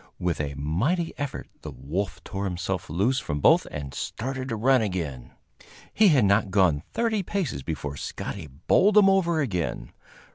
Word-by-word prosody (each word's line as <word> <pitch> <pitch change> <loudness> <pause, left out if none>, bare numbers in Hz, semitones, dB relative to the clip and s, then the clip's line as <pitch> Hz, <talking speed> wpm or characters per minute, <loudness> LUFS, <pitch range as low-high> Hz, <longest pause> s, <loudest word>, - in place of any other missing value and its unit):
With 85 -3 -1
a 70 -1 -4
mighty 110 - -1
effort 145 -2 -4
the - - -7
wolf 80 +11 -4
tore 100 +1 -4
himself 90 0 -3
loose 105 - +1
from 75 - -3
both - - +4
and 70 -2 -6
started 130 +2 -4
to 115 - -1
run 130 +3 +3
again. 80 - -3 0.6
He 215 - +5
had 140 - +5
not 100 +1 +3
gone 95 -7 +3
thirty 225 -3 0
paces 180 - -3
before 70 -1 -5
Scotty 90 +2 -6
bowled 185 - +2
him 195 -2 +7
over 170 -4 +2
again. 90 - -3
100 Hz, 160 wpm, -26 LUFS, -, 0.6 s, him